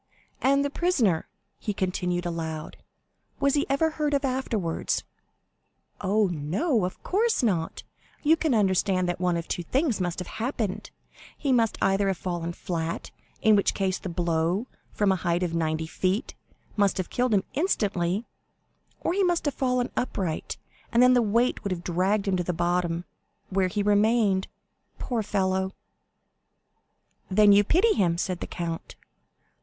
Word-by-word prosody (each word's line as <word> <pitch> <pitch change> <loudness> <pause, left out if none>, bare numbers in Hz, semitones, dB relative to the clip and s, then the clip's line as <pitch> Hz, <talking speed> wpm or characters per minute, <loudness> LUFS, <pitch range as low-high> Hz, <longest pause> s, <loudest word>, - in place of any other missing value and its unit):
And 275 +1 +3
the 285 - -2
prisoner," 250 - +1 0.3
he 210 -3 -3
continued 180 -2 -1
aloud, 160 -2 -4 0.6
"was 280 -1 +2
he 290 - +1
ever 315 +4 +2
heard 300 -2 0
of 280 0 0
afterwards?" 230 -10 -1 1.0
"Oh, 205 +2 +3
no; 190 - 0
of 185 - -6
course 445 - +1
not. 175 -8 0 0.4
You 315 +2 +5
can 315 -6 +1
understand 190 -2 +2
that 175 0 -2
one 180 -1 +1
of 170 - -5
two - - -2
things 255 - 0
must 175 -1 -1
have 180 - -5
happened; 215 -5 -2 0.5
he 280 - -1
must 230 -3 +2
either 195 +1 +2
have 190 -2 0
fallen 170 -2 -3
flat, 165 -1 -4 0.3
in 220 -1 +6
which 200 - +2
case 190 -1 0
the 185 - -5
blow, 170 +4 0 0.3
from 205 -2 +2
a 190 - +2
height 175 +1 0
of 170 -2 -2
ninety 160 -1 0
feet, 185 - -1 0.4
must 200 -2 +2
have 185 - -3
killed 250 0 +1
him 195 - +2
instantly, 205 - 0 0.8
or - - 0
he 395 +1 +2
must 350 -3 +1
have 290 - +1
fallen 250 -2 0
upright, 185 -9 -2 0.3
and 235 +1 +5
then 250 0 +7
the 245 - +5
weight 230 +3 +1
would 200 - -2
have 180 -2 -3
dragged 190 +4 +1
him 195 - +2
to 180 - 0
the 180 - -2
bottom, 175 0 0 0.5
where 190 0 +2
he 205 +3 -1
remained—poor 210 +2 0
fellow!" 190 -2 0 1.6
"Then 205 +2 +6
you 200 +1 +6
pity 375 - +3
him?" 175 -5 +1
said 180 0 -2
the - - -5
count. 170 -2 -5
195 Hz, 160 wpm, -26 LUFS, 175-245 Hz, 1.6 s, then